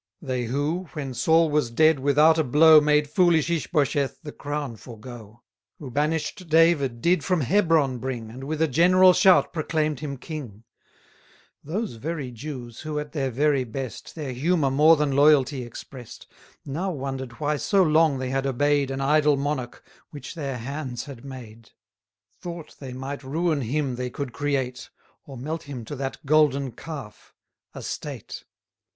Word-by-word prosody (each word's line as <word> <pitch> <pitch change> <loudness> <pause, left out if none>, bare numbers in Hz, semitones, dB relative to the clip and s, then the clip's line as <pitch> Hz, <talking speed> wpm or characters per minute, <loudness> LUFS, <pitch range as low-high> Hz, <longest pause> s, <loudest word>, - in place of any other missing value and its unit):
They 130 -5 -3
who, 145 +9 -2
when 140 -4 -5
Saul 160 +6 +3
was 150 -5 +1
dead, 155 +5 +4
without 150 +4 +4
a - - +3
blow, 155 +3 +7
Made 150 0 +2
foolish 170 0 +3
Ishbosheth 145 -4 0
the 150 - -7
crown 145 -4 -5
forego; 115 -1 -12 0.3
Who 135 -5 -9
banish'd 155 +5 -2
David 155 -7 +3
did 180 +2 +3
from 180 -4 +1
Hebron 155 - +2
bring, 120 -3 -5
And 130 +3 -9
with 155 +2 -1
a - - +3
general 180 +5 +5
shout 185 0 +4
proclaim'd 155 -3 -1
him 140 -2 -5
king: 125 - -8 1.0
60 150 - -11
Those 215 - -2
very 145 0 -4
Jews, 120 -2 -8
who, 155 -1 -5
at 150 -1 -4
their 135 -4 -1
very 140 +2 +1
best, 125 +1 -7
Their 145 -5 -5
humour 145 +1 +1
more 155 +4 +6
than 150 -1 0
loyalty 140 -2 +4
express'd, 125 0 -10 0.4
Now 165 +8 -3
wonder'd 135 -5 -5
why 150 +4 -1
so 195 +5 +2
long 155 -3 +3
they 130 0 -3
had 135 0 -1
obey'd 145 +1 +1
An 135 0 -3
idol 150 +1 +3
monarch, 135 -3 -4 0.2
which 145 - -9
their 140 -6 -4
hands 130 0 -5
had 135 -5 -10
made; 115 -5 -11 0.7
Thought 170 -3 -8
they 135 -2 -7
might 135 +2 -6
ruin 155 +2 0
him 135 +1 -2
they 125 0 -3
could 130 0 -6
create, 135 -3 -2 0.4
Or 135 -2 -9
melt 155 +6 -4
him 125 -5 -6
to 145 - -6
that 135 +1 -5
golden 140 -3 +3
calf 120 -5 -10 0.4
a - - -7
state. - - -7
145 Hz, 160 wpm, -25 LUFS, 130-155 Hz, 1.0 s, blow